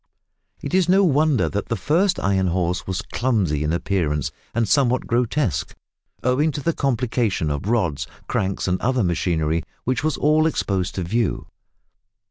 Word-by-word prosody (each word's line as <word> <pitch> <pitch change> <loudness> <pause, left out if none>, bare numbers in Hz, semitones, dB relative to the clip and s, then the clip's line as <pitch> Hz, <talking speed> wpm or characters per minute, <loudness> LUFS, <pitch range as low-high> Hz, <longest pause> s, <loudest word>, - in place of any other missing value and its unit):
It - - -5
is 185 -2 +3
no 195 +2 +5
wonder 150 -5 +3
that 100 0 -3
the 115 - -1
first 180 - +1
Iron 95 -1 +1
Horse 90 0 -1
was 95 +2 -2
clumsy 100 - 0
in 75 - 0
appearance 85 -5 -1 0.2
and 115 -2 +1
somewhat 130 -3 +2
grotesque, 120 - 0 0.5
owing 135 +5 +2
to 145 - -5
the 165 - +1
complication 115 - 0
of 70 +6 -3
rods, 80 - 0 0.2
cranks, 95 0 -1
and 90 0 0
other 125 0 +1
machinery, 85 -2 0 0.2
which 130 +1 -1
was 155 -3 0
all 155 +2 +3
exposed 95 - -1
to 95 - -2
view. 110 +4 -1
110 Hz, 155 wpm, -22 LUFS, 90-140 Hz, 0.5 s, no